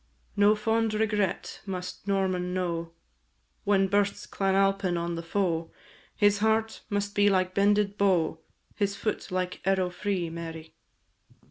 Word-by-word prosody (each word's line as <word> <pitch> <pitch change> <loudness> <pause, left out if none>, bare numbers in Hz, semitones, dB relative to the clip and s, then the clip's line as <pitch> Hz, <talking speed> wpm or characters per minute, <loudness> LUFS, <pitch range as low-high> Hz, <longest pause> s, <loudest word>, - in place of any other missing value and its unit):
No 205 +1 +5
fond 220 0 0
regret 210 -3 -1
must 180 +1 -6
Norman 185 -2 0
know; 170 -2 -2 0.7
When 195 -1 +3
bursts 205 +1 +1
Clan 195 -1 0
Alpine 195 -2 +2
on 170 0 -2
the 165 - -3
foe, 165 -2 -1 0.4
His 205 -1 +3
heart 220 +1 +1
must 205 0 -1
be 205 0 +4
like 185 -1 +1
bended 205 0 +2
bow, 175 -5 +2 0.4
His 200 -1 0
foot 210 0 -3
like 185 -1 -2
arrow 190 -1 +1
free, 180 -1 -2
Mary. 165 -1 -7
195 Hz, 135 wpm, -28 LUFS, 180-205 Hz, 0.7 s, No